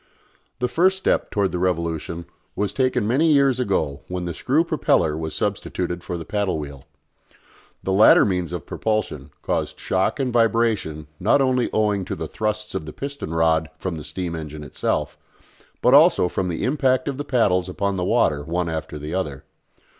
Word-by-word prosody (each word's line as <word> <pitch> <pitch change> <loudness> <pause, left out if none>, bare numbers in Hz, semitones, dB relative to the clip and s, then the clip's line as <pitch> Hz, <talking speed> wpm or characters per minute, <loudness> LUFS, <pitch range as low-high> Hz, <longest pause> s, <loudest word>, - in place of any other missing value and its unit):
The 125 - 0
first 185 +8 +3
step 190 - 0
towards 100 -2 0
the 90 - -2
revolution 85 -1 -2 0.3
was 100 -1 -1
taken 130 -2 +1
many 150 +8 +3
years 140 -3 +4
ago 80 - -1
when 90 -1 -4
the 85 - -3
screw 140 - +1
propeller 155 - +1
was 80 0 -4
substituted 90 -1 -2
for 90 - -4
the 80 - -7
paddle 100 -1 -1
wheel. 70 -3 -7 1.0
The 95 - -1
latter 105 +3 +7
means 90 -3 -1
of 90 -4 -5
propulsion 105 -11 -2
caused - - -2
shock 95 +9 0
and 130 -3 -1
vibration 115 -9 +1
not 110 +9 +3
only 130 -2 +2
owing 105 -2 +1
to - - -4
the - - -5
thrusts 105 0 -3
of 80 - -4
the 75 - -7
piston 140 - -6
rod 80 -1 +2
from 95 +2 -3
the 80 -2 -6
steam 85 +3 -4
engine 75 -1 -7
itself, 70 - -2 0.6
but 125 - +5
also 150 - +6
from 90 +1 -2
the 85 - -3
impact 130 +1 +1
of 140 -2 -2
the - - -1
paddles 105 -10 +1
upon 100 +1 -1
the 90 - -2
water 75 -4 +2
one 85 +2 -2
after 80 -1 -4
the 75 +2 -6
other. 75 -7 -3
95 Hz, 180 wpm, -23 LUFS, 80-120 Hz, 1.0 s, latter